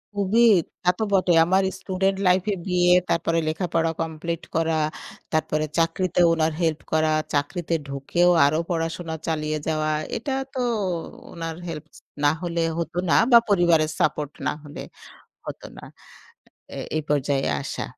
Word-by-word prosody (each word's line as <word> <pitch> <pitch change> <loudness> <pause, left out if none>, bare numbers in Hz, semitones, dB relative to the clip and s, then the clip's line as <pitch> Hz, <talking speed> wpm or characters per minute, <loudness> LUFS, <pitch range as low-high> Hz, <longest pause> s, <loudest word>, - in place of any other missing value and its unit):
খুবই, 205 +4 +2 0.4
তা 180 - +3
তো 220 - -1
বটে। 185 -2 +3
আমার 190 +2 +2 0.2
স্টুডেন্ট 190 0 -1
লাইফে 185 +3 +2
গিয়ে, 180 -1 +3 0.2
তারপরে 165 0 +1
লেখাপড়া 165 0 0
কমপ্লিট 165 +1 -4
করা, 165 -1 +1 0.6
তারপরে 155 -1 0
চাকরিতে 170 +2 +1
উনার 160 -1 +1
হেল্প 160 -2 +1
করা, 155 0 +3 0.2
চাকরিতে 160 +4 -1
ঢুকেও 140 +6 +1 0.2
আরো 150 +2 +2
পড়াশোনা 165 0 -3
চালিয়ে 155 -1 -1
যাওয়া, 155 -1 0 0.3
এটা 270 +4 -3 0.2
তো 260 - -4 0.7
উনার 165 -1 -5
হেল্প 155 -2 -6 0.4
না 145 - +6
হলে 170 -1 -2 0.2
হতো 170 +1 -4
না - - +4 0.2
বা 235 - +10
পরিবারের 170 -5 +3
সাপোর্ট 150 -1 0 0.2
না - - +2
হলে 145 0 -9 0.7
হতো - - -7
না। - - -11 0.9
এ - - -6 0.2
এই 155 - +1
পর্যায়ে 140 -1 +1 0.2
আসা। - - -4
165 Hz, 140 wpm, -24 LUFS, 155-180 Hz, 0.9 s, বা